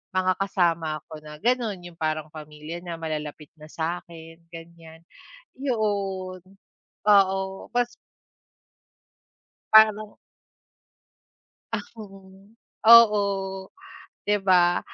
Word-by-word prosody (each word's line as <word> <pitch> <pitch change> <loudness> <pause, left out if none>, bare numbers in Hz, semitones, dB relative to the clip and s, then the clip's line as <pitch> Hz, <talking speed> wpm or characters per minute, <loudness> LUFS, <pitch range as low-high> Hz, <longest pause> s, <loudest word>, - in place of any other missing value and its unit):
mga 185 0 +2
kasama 170 -5 0
ko 155 - -8
na 150 0 -10
gano'n 235 -3 0
'yung - - -20
parang 155 -1 -2
pamilya 155 +2 -9
na, 170 -2 -6
malalapit 150 -2 -6
na 155 - -12
sa 170 +2 -3
akin, 165 -1 -13
ganyan. 165 -1 -13 0.6
'Yoon. 200 -7 -2 0.7
Oo, 195 -1 +2
bas 245 0 0 1.8
Parang 215 -1 +5 1.6
Ah, - - -2 0.2
oo. 195 -1 -14 0.4
Oo, 225 -3 +8 1.0
'di 205 0 +1
ba? 180 -2 +3
185 Hz, 90 wpm, -25 LUFS, 160-205 Hz, 1.8 s, Oo